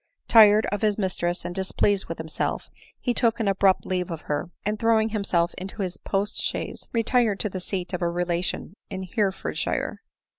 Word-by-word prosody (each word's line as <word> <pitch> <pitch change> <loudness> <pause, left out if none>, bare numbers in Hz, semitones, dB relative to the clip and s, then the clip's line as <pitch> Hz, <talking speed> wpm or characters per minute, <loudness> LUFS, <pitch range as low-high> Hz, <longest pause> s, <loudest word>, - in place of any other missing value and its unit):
tired 215 -1 +7
of 205 - -2
his 210 -2 +2
mistress, 180 -3 -1
and 175 - -3
displeased 195 +1 +1
with 165 - -5
himself, 160 -1 -3 0.3
he 245 - 0
took 230 -1 +2
an 220 - 0
abrupt 195 -1 +3
leave 180 -1 -1
of 165 -2 -5
her, 150 +3 -3 0.2
and 210 +1 -1
throwing 225 -1 +3
himself 195 -5 0
into 195 +2 -4
his 185 -1 -4
post 200 +1 -2
chaise, - - -3
retired 230 -2 +2
to 210 - -1
the 185 - -5
seat 185 0 -4
of 180 - -2
a 170 - +2
relation 175 0 -2 0.2
in 190 0 -5
Hereford 195 0 -1
shire. - - -2
195 Hz, 185 wpm, -25 LUFS, 180-215 Hz, 0.3 s, tired